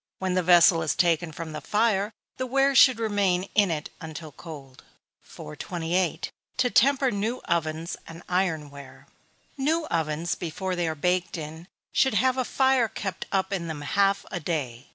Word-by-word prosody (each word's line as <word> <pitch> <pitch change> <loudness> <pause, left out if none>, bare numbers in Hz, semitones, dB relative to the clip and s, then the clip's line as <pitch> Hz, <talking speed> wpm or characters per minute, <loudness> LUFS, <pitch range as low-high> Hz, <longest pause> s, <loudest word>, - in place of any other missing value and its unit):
When 185 -1 -1
the 185 - +2
vessel 175 -1 +6
is 155 - 0
taken 170 -1 +2
from 160 +1 -7
the 155 - -6
fire, 210 -1 +1 0.3
the 255 - -2
ware 275 +2 +3
should 260 -2 +7
remain 200 -5 +1
in 205 -3 +4 0.3
until 160 -1 -8
cold. 140 -4 -11 0.4
428. 170 - -3 0.3
To 255 -1 +2
temper 270 +1 +4
New 215 +5 -2
Ovens 165 0 -1
and 165 +1 -10
Iron 175 -5 0
ware. 140 -1 -12 0.5
New 315 +4 +1
ovens, 160 +1 -1
before 185 +2 -4
they 175 -1 -1
are 160 - -2
baked 180 +4 0
in, 160 +2 -8 0.3
should 265 -4 +3
have 255 +5 +3
a - - +2
fire 265 -1 +2
kept 195 -4 -5
up 190 0 0
in 175 -3 -2
them 155 -2 -5
half 195 +6 +1
a 175 - -3
day. 140 -8 -4
180 Hz, 165 wpm, -26 LUFS, 160-210 Hz, 0.5 s, should